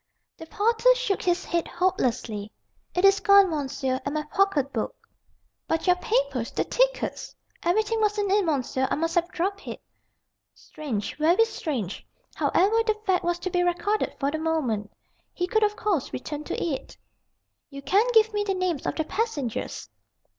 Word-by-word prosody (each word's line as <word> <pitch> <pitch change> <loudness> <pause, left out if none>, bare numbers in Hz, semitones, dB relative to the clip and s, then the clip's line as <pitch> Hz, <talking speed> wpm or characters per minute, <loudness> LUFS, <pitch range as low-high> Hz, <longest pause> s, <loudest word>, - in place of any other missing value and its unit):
The 325 - -11
porter 460 +6 +3
shook - - -1
his 355 +1 0
head 340 -1 -1
hopelessly. 235 - -1 0.4
"It 360 +2 +3
is 395 0 +6
gone, 400 -2 +6
monsieur, 270 -3 -2
and 285 +2 -3
my 305 - -1
pocket 300 -4 +1
book." 225 - -2 0.7
"But 325 0 -1
your 360 -1 +4
papers, 275 -8 0
the - - -1
tickets - - -1
" - - -35
"Everything 435 +5 +1
was 420 0 +1
in 405 -2 0
it, 410 0 +4
monsieur. 265 -4 0
I - - +1
must 330 +2 -1
have 345 -1 +2
dropped 390 +3 -3
it." - - -6 0.8
Strange, 245 -10 -5
very 340 +9 +4
strange. 260 - -4 0.3
However 425 +5 +2
the 435 -1 +1
fact 375 -2 +2
was 345 0 0
to 370 - -3
be 355 - +2
recorded, 355 +4 0
for 280 0 0
the 315 - -3
moment. 265 -11 -1 0.4
He 355 - 0
could 440 +4 +1
of 420 0 +2
course 400 - -1
return 295 +3 -5
to - - -3
it. 300 -6 -4 0.7
"You 275 -1 -9
can 395 - +3
give 445 -2 +4
me 415 0 0
the 390 -2 -1
names 365 -6 -1
of - - -1
the 315 - 0
passengers?" 310 - -3
350 Hz, 175 wpm, -26 LUFS, 285-405 Hz, 0.8 s, is